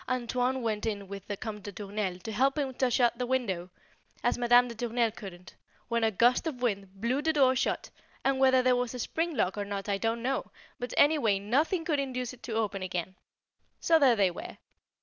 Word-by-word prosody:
"Antoine" 255 Hz, +1 st, 0 dB
went 215 Hz, -1 st, -1 dB
in 200 Hz, -3 st, -3 dB
with 195 Hz, 0 st, -8 dB
the 205 Hz, -, -4 dB
Comte 210 Hz, 0 st, -6 dB
de 205 Hz, -, -7 dB
Tournelle 200 Hz, -1 st, -4 dB
to 205 Hz, +4 st, -7 dB
help 270 Hz, +6 st, +2 dB
him 275 Hz, -3 st, -1 dB
to 255 Hz, 0 st, +1 dB
shut 240 Hz, -1 st, +2 dB
the 250 Hz, -, -1 dB
window, 195 Hz, -9 st, -1 dB, 0.5 s
as -, -, +2 dB
Madame 245 Hz, 0 st, +5 dB
de 235 Hz, -, -6 dB
Tournelle 235 Hz, 0 st, 0 dB
couldn't, 185 Hz, -4 st, -10 dB, 0.4 s
when 235 Hz, -1 st, +1 dB
a 225 Hz, -, +4 dB
gust 240 Hz, -, +3 dB
of 280 Hz, -6 st, -4 dB
wind 195 Hz, -4 st, -2 dB
blew 245 Hz, +6 st, 0 dB
the 320 Hz, +1 st, +2 dB
door 265 Hz, -3 st, +4 dB
shut, 260 Hz, -, -1 dB, 0.3 s
and 270 Hz, -1 st, +2 dB
whether 260 Hz, -1 st, +5 dB
there 255 Hz, 0 st, +4 dB
was 245 Hz, 0 st, -2 dB
a -, -, -4 dB
spring 325 Hz, +6 st, -2 dB
lock 190 Hz, +3 st, 0 dB
or -, -, 0 dB
not 200 Hz, 0 st, -5 dB
I 200 Hz, -1 st, 0 dB
don't 230 Hz, +2 st, -1 dB
know, 265 Hz, +2 st, -1 dB, 0.3 s
but 245 Hz, 0 st, -4 dB
any 300 Hz, +1 st, +5 dB
way 215 Hz, -6 st, +2 dB
nothing 295 Hz, -, 0 dB
would 300 Hz, -4 st, +1 dB
induce 255 Hz, -2 st, -3 dB
it 250 Hz, -, -15 dB
to 230 Hz, -, -5 dB
open 210 Hz, -3 st, -1 dB
again. 185 Hz, -1 st, -3 dB, 0.7 s
So 325 Hz, -1 st, +4 dB
there 265 Hz, -5 st, +5 dB
they 195 Hz, -4 st, +3 dB
were. 175 Hz, -, -8 dB
235 Hz, 220 wpm, -29 LUFS, 205-260 Hz, 0.7 s, Madame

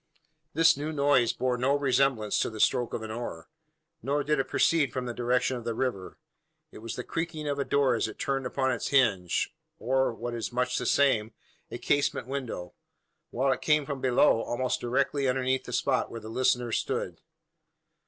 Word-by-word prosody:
This 165 Hz, +1 st, +5 dB
new 150 Hz, +3 st, -4 dB
noise 140 Hz, -5 st, +3 dB
bore 125 Hz, -1 st, -1 dB
no 135 Hz, +3 st, +2 dB
resemblance 135 Hz, -6 st, +1 dB
to -, -, 0 dB
the 110 Hz, -1 st, -9 dB
stroke 120 Hz, +3 st, +2 dB
of 110 Hz, -, -5 dB
an 110 Hz, -, -6 dB
oar; 110 Hz, -8 st, -6 dB, 0.5 s
nor 140 Hz, +4 st, 0 dB
did 150 Hz, -1 st, +1 dB
it 135 Hz, -, 0 dB
proceed 155 Hz, -7 st, +2 dB
from 125 Hz, 0 st, -3 dB
the 120 Hz, -, -4 dB
direction 125 Hz, +2 st, 0 dB
of 120 Hz, -, -8 dB
the 115 Hz, -1 st, -3 dB
river. 115 Hz, -8 st, -3 dB, 0.5 s
It -, -, -11 dB
was 115 Hz, +1 st, -6 dB
the 125 Hz, -, -5 dB
creaking 160 Hz, -1 st, -4 dB
of 145 Hz, -1 st, -2 dB
a -, -, +1 dB
door 140 Hz, -2 st, +2 dB
as 115 Hz, -, 0 dB
it 110 Hz, -, -9 dB
turned 135 Hz, -2 st, -1 dB
upon 130 Hz, +1 st, 0 dB
its 120 Hz, -, -2 dB
hinge, 105 Hz, -11 st, +2 dB, 0.2 s
or, 130 Hz, +3 st, +1 dB
what 120 Hz, +1 st, -5 dB
is 115 Hz, +1 st, -4 dB
much 125 Hz, +1 st, 0 dB
the -, -, -3 dB
same, 115 Hz, -6 st, +2 dB, 0.4 s
a -, -, -6 dB
casement 145 Hz, -4 st, 0 dB
window; 125 Hz, -10 st, -5 dB, 0.6 s
while 135 Hz, +3 st, +1 dB
it 130 Hz, -, -1 dB
came 150 Hz, -2 st, +2 dB
from 140 Hz, -2 st, -5 dB
below 125 Hz, -2 st, +4 dB
almost 125 Hz, +2 st, -2 dB
directly 135 Hz, +3 st, 0 dB
underneath 130 Hz, 0 st, 0 dB
the -, -, -7 dB
spot -, -, +1 dB
where 115 Hz, -, -7 dB
the 110 Hz, 0 st, -9 dB
listener 125 Hz, 0 st, +1 dB
stood. -, -, -2 dB
130 Hz, 195 wpm, -28 LUFS, 120-140 Hz, 0.6 s, This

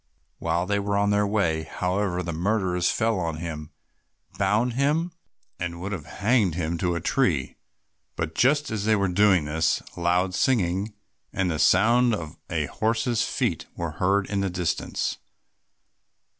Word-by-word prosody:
While 85 Hz, +1 st, 0 dB
they 100 Hz, +1 st, 0 dB
were 100 Hz, 0 st, -1 dB
on 100 Hz, 0 st, +2 dB
their 105 Hz, 0 st, +2 dB
way, 100 Hz, -7 st, +1 dB
however, 90 Hz, +3 st, -2 dB
the 85 Hz, -1 st, -4 dB
murderers 90 Hz, 0 st, 0 dB
fell 110 Hz, -3 st, +1 dB
on 80 Hz, -3 st, -2 dB
him, 80 Hz, -2 st, -6 dB, 0.7 s
bound 105 Hz, +5 st, +2 dB
him, 150 Hz, +7 st, +1 dB, 0.5 s
and 85 Hz, -1 st, -4 dB
would 95 Hz, +3 st, -5 dB
have 85 Hz, -6 st, -5 dB
hanged 100 Hz, -2 st, +1 dB
him 85 Hz, -1 st, -2 dB
to 90 Hz, -1 st, 0 dB
a -, -, -1 dB
tree. 85 Hz, -, 0 dB, 0.6 s
But 80 Hz, -1 st, -3 dB
just 145 Hz, -, +2 dB
as 105 Hz, -2 st, -2 dB
they 110 Hz, 0 st, +4 dB
were 100 Hz, -1 st, +1 dB
doing 95 Hz, -3 st, +4 dB
this, 80 Hz, +2 st, +1 dB, 0.2 s
loud 90 Hz, +2 st, +1 dB
singing 100 Hz, -2 st, +1 dB, 0.4 s
and 95 Hz, -2 st, 0 dB
the 80 Hz, -, -2 dB
sound 120 Hz, +5 st, +4 dB
of 80 Hz, -4 st, -7 dB
a 80 Hz, -4 st, 0 dB
horse's 115 Hz, -, 0 dB
feet 115 Hz, -9 st, -1 dB
were 85 Hz, -2 st, -3 dB
heard 95 Hz, +5 st, +1 dB
in 100 Hz, -1 st, -1 dB
the 100 Hz, -, 0 dB
distance. 90 Hz, -2 st, -2 dB
95 Hz, 155 wpm, -25 LUFS, 85-110 Hz, 0.7 s, they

